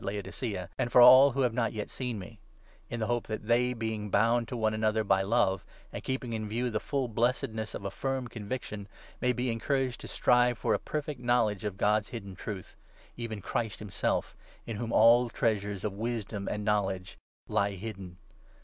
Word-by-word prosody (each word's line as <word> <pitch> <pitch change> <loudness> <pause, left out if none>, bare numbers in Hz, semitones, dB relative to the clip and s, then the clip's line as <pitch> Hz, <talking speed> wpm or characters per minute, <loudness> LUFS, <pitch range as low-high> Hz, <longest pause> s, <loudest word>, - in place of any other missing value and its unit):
aj - - -9
Laodicea, 100 -1 -4
and 120 - 0
for - - +6
all 130 +3 +10
who 135 - 0
have 125 -3 +2
not 115 -2 0
yet 105 -2 -5
seen 125 -4 -3
me; 100 +3 -10 0.5
in 120 - -4
the 110 - 0
hope 120 +1 -1
that 110 -1 -4
they, 120 +2 +3
being 110 -3 -3
bound 115 +3 +3
to 125 - -4
one 110 -1 +1
another 110 0 +1
by 100 -2 +3
2 95 - -3
love, 95 -4 +2 0.3
and - - -6
keeping 130 -3 -3
in 110 -1 -3
view 120 +3 -1
the 110 - 0
full 135 +2 -1
blessedness 115 -1 -1
of 100 - -7
a 100 - -2
firm 135 +2 -2
convic 115 +2 -5
tion, 100 -2 -7 0.3
may 125 - +3
be 125 0 -1
encouraged 130 +2 -1
to - - -8
strive 125 0 +3
for - - +1
a - - +1
perfect 150 -3 -4
knowledge 120 -5 +1
of 105 -2 -3
God's 105 +1 +2
hidden 100 -5 -7
Truth, 100 0 -7 0.4
even 115 -3 -5
Christ 110 +1 -2
himself, 105 -3 -2 0.3
in 115 - -5
whom 115 +1 -3
all 120 +2 +6
treasures 105 -4 -1
'3 - - 0
of - - -11
wisdom 110 -3 -3
and 105 0 -3
knowledge 95 -3 -1 0.3
lie 100 0 +1
hidden. 95 -3 -7
110 Hz, 205 wpm, -30 LUFS, 105-120 Hz, 0.5 s, all